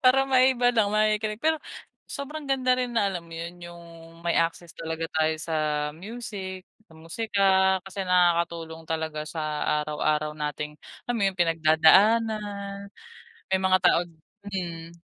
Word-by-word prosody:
Para 270 +1 +5
maiba 255 -2 +4
lang, 220 -4 +3
makikinig 215 0 +1
pero 315 +6 0 0.5
sobrang 285 0 -6
ganda 255 -2 +2
rin 245 -2 -2
na, 200 -3 +2
alam 170 -2 -6
mo - - -12
yon, 170 +2 -7
yung 175 0 -10 0.4
may 170 - +1
access 165 0 -2
talaga 160 0 -4
tayo 160 0 +1
sa 160 0 -4 0.4
music, 190 0 -7 0.2
sa - - -19
musika, 200 +5 -3 0.4
kasi 195 0 -5
nakakatulong 170 -2 +1
talaga 160 -1 -3
sa 160 - -5 0.4
araw-araw 150 0 -1
nating, 150 0 -5 0.3
alam 245 - -2
mo - - -1
yon, 190 - -6
pinagdadaanan 200 +5 +3 0.6
may 190 - +3
mga 190 0 +4
tawag 175 0 +4 0.4
Hmm. 170 -4 -5
185 Hz, 140 wpm, -26 LUFS, 165-215 Hz, 0.6 s, Para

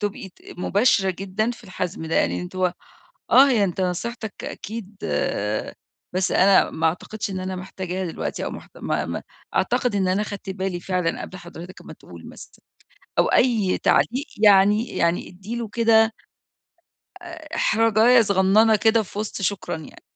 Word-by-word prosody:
تبقي 205 -1 -4
ت - - -26 0.2
مباشرة 195 0 +2
جدًا 195 +5 -2
في 240 -1 -10
الحَزْم 185 -3 -5
ده. 160 - -3
يعني - - +1
أنتِ 180 +1 -9
هو 180 -1 +1 0.6
آه، 275 +2 +7
هي 225 -6 +3
أنت 190 0 -3
نصيحتك 215 +4 -4
أكيد 215 -1 -7 1.2
بس 185 0 0
أنا 195 0 +5
ما 160 0 -1
أعتقدش 200 +5 -3
إن 185 - -4
أنا 185 0 -4
محتاجها 185 0 -5
دلوقتي 165 - -4
أو - - -3
محت - - -11
ما - - -2
ما - - -4 0.3
أعتقد 245 -5 +1
إن 190 -2 +1
أنا 190 +3 +1
خدت 200 -2 -6
بالي 190 -2 -3
فعلًا 180 -2 -2
قبل 185 - -8
حضرتك 175 0 -11
ما - - -10
تقول - - -13
مثلًا - - -14 0.6
أو - - +5
أي 225 -7 +2
تعليق 260 +5 +1 0.2
يعني 205 +3 +5
يعني 170 +1 0
ادّي 195 +6 -8
له 235 -2 -4
كده 225 0 +4 1.1
آآ 335 -3 -9
إحراجاية 225 +2 +4
صغنّنة 205 +2 +4
كده 220 +1 +3
في 200 +2 -8
وِسط 210 -2 -4
شكرًا 195 -2 -2
يعني. 160 - -13
195 Hz, 160 wpm, -23 LUFS, 185-225 Hz, 1.2 s, آه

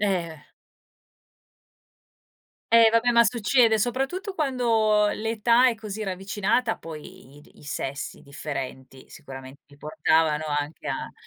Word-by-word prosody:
Eh. 175 -7 -2 2.3
Eh, 230 -1 +8
vabbè, 230 +2 +3
ma 235 0 +6
succede, 230 0 +3
soprattutto 270 - -2
quando 230 - +2
l'età 230 +3 +2
è 240 - 0
così 215 -1 -7
ravvicinata, 200 +5 -1
poi 160 -2 -11
i - - -14
di - - -22
i - - -16
sessi 140 -1 -5
differenti, 135 -2 -7
sicuramente 135 +1 -11
ti 140 - -19
portavano 155 +1 +1
anche 150 +1 -4
a - - -4
200 Hz, 115 wpm, -25 LUFS, 150-230 Hz, 2.3 s, Eh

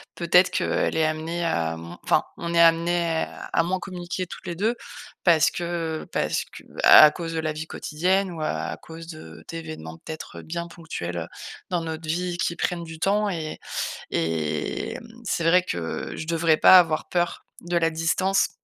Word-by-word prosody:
Peut-être 180 +1 +4
qu'elle - - 0
est 160 - +3
amenée 160 +2 -2
à, 80 - 0
hem 85 +1 -9
enfin, - - +2
on 170 0 -4
est 170 - +3
amenées 170 0 +3 0.3
à 165 - +4
moins 185 +2 -1
communiquer 180 0 -5
toutes 185 - -10
les 175 - -3
2 220 +6 +1 0.5
parce 165 -4 +5
que 170 -2 -3
parce - - 0
que, - - -13 0.2
bah, - - +10
à 150 - +5
cause 165 -1 -5
de 165 - -2
la 155 -1 -1
vie 155 +1 -6
quotidienne 185 +4 0
ou 165 - -6
à 155 - -2
cause 165 0 -10
de 155 -2 -11
d'événements, 155 - -7
peut-être, 160 0 -8
bien 170 +1 -5
ponctuels, 160 - -6
heu, 80 - -4 0.4
dans 175 -2 0
notre 160 0 -5
vie 175 +1 -1
qui 170 0 -1
prennent 175 0 -1
du 160 -1 -9
temps. 205 +3 +2
Et 160 -4 -4 0.5
et 80 -2 -1
hem, 230 - -9 0.2
c'est 175 - -1
vrai 180 +2 +5
que, 85 - -4
je 160 - -5
devrais 165 -1 +3
pas 185 - +9
avoir 165 -3 +2
peur 175 -1 -1 0.2
de 175 0 -2
la 165 -1 +3
distance, 175 +4 +1
165 Hz, 185 wpm, -25 LUFS, 160-175 Hz, 0.5 s, bah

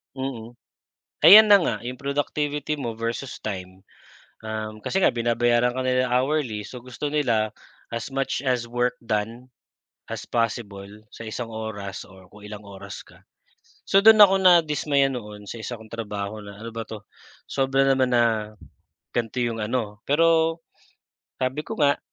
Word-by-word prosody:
Mm. 130 -4 -5 0.7
Ayan 215 +3 +10
na - - +10
nga, - - 0
'yong 125 +2 -6
productivity 145 +1 -2
mo 120 -7 -4
versus 115 +3 -4
time. 95 -2 -7 0.6
Uhm, 110 0 -5
kasi 190 - -1
nga - - +5
binabayaran 120 +1 +1
ka 130 - -2
nila 130 0 +1
hourly, 125 -4 0
so 125 - -9
gusto 125 +4 -6
nila 115 -8 +1 0.4
as 115 +3 -5
much 135 -1 -1
as 125 -2 0
work 120 +1 0
done, 115 +3 -3 0.6
as - - -6
possible 105 -4 -2 0.2
sa 115 - -10
isang 115 +1 -5
oras, 105 -3 -6
or 95 -1 -17
kung 105 0 -14
ilang 105 0 -8
oras 100 0 -9
ka. - - -19 0.7
So 195 +1 +4
do'n 220 -1 +8
ako 195 -2 +9
nadismaya 150 -5 +4
noon 105 -5 -8
sa 115 - -6
isa 120 +2 -5
kong 110 -1 -14
trabaho 105 -2 -5
na, 100 0 -11
ano 115 - -7
ba 115 0 -5
'to, 110 0 -8 0.5
sobra 135 0 +1
naman 130 -2 +2
na, 110 -3 +2 0.6
ganito 120 +1 -2
'yong 115 -1 -2
ano. 105 -1 -3
Pero, 165 +2 +3 0.8
sabi 130 +3 -2
ko - - -4
nga, 145 -1 +3
120 Hz, 155 wpm, -24 LUFS, 110-135 Hz, 0.8 s, Ayan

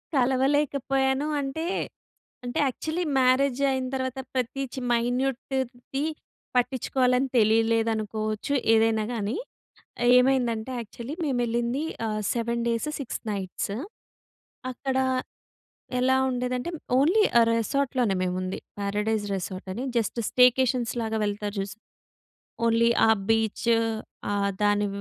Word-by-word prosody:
కలవలేకపోయాను. 270 +1 +2 0.2
అంటే 280 +4 -3 0.8
అంటే 245 - -2
actually 315 +7 -2 0.2
marriage 260 +1 +3
అయిన 260 -1 -1
తర్వాత 260 0 -3
ప్రతి 260 +1 -1
చి - - -4
మైన్యూట్‌ది 255 +2 -1 0.5
పట్టిచ్చుకోవాలని 250 +1 +2
తెలీలేదు 225 +1 +3
అనుకోవచ్చు, 215 +4 -3 0.2
ఏదైనా 225 -1 +3
గానీ. 220 +1 -2 0.8
ఏమైందంటే 250 -2 +1
యక్చువల్లి 235 +6 -7
మేమెళ్ళింది 240 0 0 0.2
ఆహ్, 215 -1 -2
7 235 0 -1
డేస్ 230 +5 0
6 270 - -5
నైట్స్. 195 0 -3 1.0
అక్కడ 265 +1 -2 1.0
ఎలా 260 +1 +3
ఉండేదంటే 250 +4 -2 0.3
ఓన్లీ 360 +10 +4 0.2
ఆహ్, 230 - +5
రెసార్ట్‌లోనే 245 -2 0
మేముంది. 185 +1 -2 0.2
పారడైస్ 210 +1 -1
రెసార్ట్ 185 0 -6
అని 250 - -4
జస్ట్ 230 +1 -1
స్టేకేషన్స్‌లాగా 245 -3 +3
వెళ్తారు 205 0 -3
చూశ్ 195 +1 -4 0.9
ఓన్లీ 230 0 +4 0.2
ఆ - - +5 0.2
బీచు, 225 +1 +2 0.6
ఆ - - +1 0.3
దాని 205 0 +3
245 Hz, 100 wpm, -26 LUFS, 220-265 Hz, 1.0 s, ఆహ్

